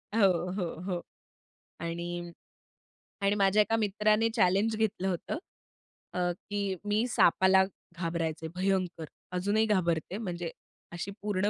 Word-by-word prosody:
हो, 200 -4 +6 0.3
हो, 185 - 0 0.2
हो. 180 -3 -1 0.8
आणि 170 +1 -4 0.9
आणि 200 +1 +3
माझ्या 200 +1 +4
एका 225 +2 +2
मित्राने 215 +1 +2
चॅलेंज 205 +2 +3
घेतलं 215 -3 0
होतं. 185 - -2 0.8
अ, 180 - -2 0.3
की 200 -2 -1
मी 210 +3 +2
सापाला 190 -3 +5 0.3
घाबरायचे 165 -2 -2
भयंकर, 185 -3 0 0.3
अजूनही 205 +4 +2
घाबरते, 180 -3 +1
म्हणजे 175 -6 -4 0.4
अशी 175 +3 -4
पूर्ण 205 -1 +1
190 Hz, 115 wpm, -30 LUFS, 175-210 Hz, 0.9 s, हो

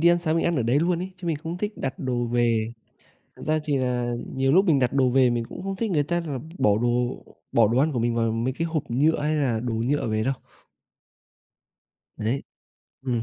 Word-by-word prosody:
đi 170 - +6
ăn 175 - +5
sáng 165 -2 0
mình 165 - +1
ăn 170 -2 +1
ở 125 - +1
đấy 120 +5 +2
luôn 170 0 +1
ấy, 185 +1 -5
chứ 180 -1 -8
mình 165 - 0
không 165 +4 -6
thích 210 +2 -2
đặt 135 -1 -4
đồ 125 -2 -1
về. 115 -1 +1 0.6
Thật - - -11
ra 155 0 +2
thì 145 -3 0
là 125 -2 -1 0.2
nhiều 135 0 +2
lúc 190 +3 +5
mình 155 -6 +4
đặt 125 -2 +1
đồ 130 -2 +3
về 130 0 +4
mình 120 -1 0
cũng - - -8
không 195 0 -3
thích 220 0 -2
người 150 -3 +2
ta 175 +4 -1
là 140 -4 -3 0.2
bỏ 105 0 +4
đồ 120 +1 0 0.3
bỏ 115 -3 +5
đồ 120 +3 +1
ăn 150 +3 +3
của 125 - -1
mình 115 0 0
vào 115 -1 +1
mấy 115 +3 -1
cái 165 +4 -2
hộp 160 -3 -1
nhựa, 150 +6 +3
hay 155 +1 +1
là 125 -7 +1
đồ 120 -1 -3
nhựa 120 +6 0
về 110 0 0
đâu. 135 - +1 1.8
Đấy. 115 +6 -1 0.6
Ừm. 120 -4 -1
135 Hz, 240 wpm, -25 LUFS, 120-160 Hz, 1.8 s, đi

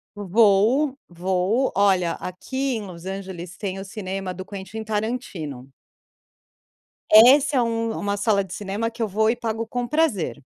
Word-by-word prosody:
Vou 215 - +3
vou, 185 +8 0
olha, 190 -3 +3
aqui 260 +8 -3
em 220 - -4
Los 170 -3 -10
Angeles, 190 -2 -7
tem 195 -2 -4
o - - -5
cinema 195 -1 -5
do 185 +1 -7
Quentin 205 +2 -7
Tarantino. 205 - -4 1.4
Essa 265 +6 +7
é - - +4
um 230 -1 -1
uma 205 0 -2
sala 200 -1 +2
de 185 -2 -9
cinema 205 +4 -3
que 230 +1 -9
eu 225 - +1
vou 220 +2 +1
e 230 - +2
pago 230 -1 -3
com 245 +1 -3
prazer. 240 - 0
205 Hz, 155 wpm, -23 LUFS, 190-230 Hz, 1.4 s, Essa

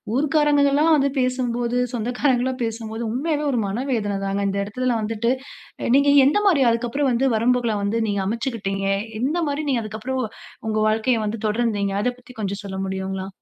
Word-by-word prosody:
ஊர்க்காரங்கலாம் 295 +1 +3
வந்து 280 -1 +2
பேசும்போது, 245 -1 0 0.2
சொந்தக்காரங்களா 245 +2 0
பேசும்போது 225 0 -4
உண்மையாவே 295 +5 -1
ஒரு 250 - 0
மன 200 +4 -3
வேதனை 205 -4 0
தாங்க. 195 +1 -1
இந்த 195 - -2
இடத்துல 250 +5 -1
வந்துட்டு, 225 +2 0 0.5
அ - - -1
நீங்க 280 +1 +5 0.2
எந்தமாரி 370 -2 +3
அதுக்கப்பறம் 240 +4 0
வந்து 245 +3 +1
வரம்புகள 240 0 +2
வந்து 205 +3 0
நீங்க 200 -1 0
அமைச்சுக்கிட்டீங்க? 200 -4 -2 0.3
எந்தமாரி 295 +1 0
நீங்க 250 -4 +1
அதுக்கப்பறம் 215 +1 -8 0.6
உங்க 215 0 0
வாழ்க்கைய 225 +2 +1
வந்து 215 +2 -3
தொடர்ந்தீங்க? 210 -3 0
அத 250 - +1
பத்தி 250 - -15
கொஞ்சம் 200 0 -3
சொல்ல 190 -1 -5
முடியுங்களா? 190 0 -4
235 Hz, 150 wpm, -22 LUFS, 210-270 Hz, 0.6 s, நீங்க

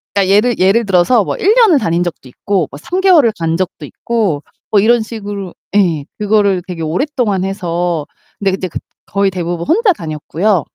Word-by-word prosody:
그러니까 195 -1 +2
예를 225 +3 +2
예를 200 +5 +3
들어서 195 +4 +3
뭐 - - -3
1 410 +4 +3
년을 430 - +5
다닌 170 -5 0
적도 170 -6 -6
있고 185 +4 -1
뭐 140 - -9
3 360 - -3
개월을 330 - +5
간 165 0 -1
적도 185 0 -4
있고 205 -11 -2 0.3
뭐 210 - +5
이런 230 +3 +4
식으로 205 -4 -6 0.2
예, 170 -8 +2
그거를 205 -3 +2
되게 175 -3 -6
오랫동안 205 - -1
해서. 175 -4 -2 0.3
근데 195 -1 +1
이제 185 0 -3
그 - - -6 0.3
거의 200 0 +1
대부분 175 -1 -3
혼자 420 +3 +3
다녔고요. 165 - -1
195 Hz, 350 characters per minute, -15 LUFS, 175-225 Hz, 0.3 s, 년을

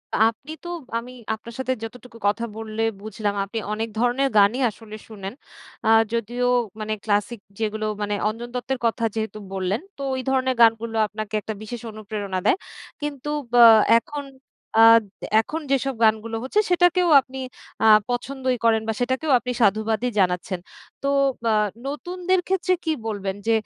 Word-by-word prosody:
আ - - +1
আপনি 270 +7 -13
তো 345 - -6 0.3
আমি 245 +2 -6 0.2
আপনার 225 +2 -9
সাথে 260 0 0
যতটুকু 240 +1 -9
কথা 210 +3 0
বললে 220 0 -5 0.2
বুঝলাম, 210 -1 -3
আপনি 215 +3 -4
অনেক 225 +1 -2
ধরনের 245 +3 +2
গানই 205 +6 +5
আসলে 215 0 -11
শুনেন। 200 -2 -7 0.5
আ - - +3 0.2
যদিও 240 +2 -1 0.3
মানে 215 0 -2
ক্লাসিক 210 +2 0 0.2
যেগুলো 215 0 -2 0.2
মানে 205 0 -1 0.2
অঞ্জন 235 +2 -6
দত্তের 255 +1 -2
কথা 230 +1 0
যেহেতু 220 -1 -3
বললেন, 190 +4 -1 0.2
তো - - -8
ঐ - - -3
ধরনের 260 -1 +1
গানগুলো 225 0 +4
আপনাকে 215 0 -7
একটা 220 - -5
বিশেষ 230 +2 -7
অনুপ্রেরণা 205 -3 -4
দেয়। - - +4 0.4
কিন্তু 295 -1 -4 0.2
বা 245 - +4 0.4
এখন 290 +4 -4 0.6
আদ 225 0 +8 0.4
এখন 315 +8 -5
যেসব 270 -1 +1
গানগুলো 220 +1 +2
হচ্ছে, 270 +11 +1
সেটাকেও 355 0 +3
আপনি 265 0 -11 0.5
আ - - +4 0.2
পছন্দই 255 +1 -1
করেন 225 -1 +4
বা, 220 - 0
সেটাকেও 260 +5 0
আপনি 250 +1 -4
সাধুবাদই 220 +3 +2
জানাচ্ছেন। 180 0 0 0.4
তো 275 - -2 0.4
বা 230 - +1 0.4
নতুনদের 360 +6 -1
ক্ষেত্রে 370 -1 +1
কী 320 - 0 0.2
বলবেন? 200 -3 -3
যে - - +4
230 Hz, 155 wpm, -23 LUFS, 215-260 Hz, 0.6 s, আদ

